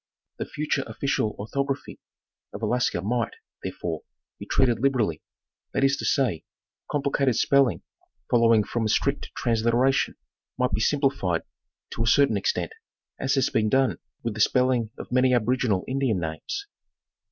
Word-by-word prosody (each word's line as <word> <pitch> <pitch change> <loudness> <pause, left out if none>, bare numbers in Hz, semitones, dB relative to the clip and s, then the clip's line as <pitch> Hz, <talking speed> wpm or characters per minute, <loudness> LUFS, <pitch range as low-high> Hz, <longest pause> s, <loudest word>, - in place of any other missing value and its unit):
The - - -2
future 145 -2 -1
official 125 -6 -1
orthography 140 +6 -3 0.6
of - - -7
Alaska 120 -7 +1
might, 115 +2 -1 0.3
therefore, 80 -3 -4 0.4
be - - -8
treated 120 -4 +2
liberally, 120 - +1 0.5
that 135 - +2
is 135 0 +4
to - - -4
say, 125 - +1 0.5
complicated 140 -3 +1
spelling 140 0 +3 0.4
following 115 -2 +4
from 115 +2 -2
a - - 0
strict 140 +6 0
transliteration 120 +3 +2 0.4
might 125 0 +1
be 100 +3 0
simplified 135 - +1 0.5
to - - -4
a 115 - +1
certain 140 0 +4
ex 100 - +1
tent, - - -4 0.5
as 135 +1 +1
has 135 - +2
been 110 -1 +2
done 135 +3 +2 0.2
with 115 - -2
the 110 - -8
spelling 125 -2 +3
of - - -9
many 130 0 +4
aboriginal 120 -4 +1
Indian 130 -7 0
names. 80 - -4
125 Hz, 145 wpm, -25 LUFS, 110-135 Hz, 0.6 s, is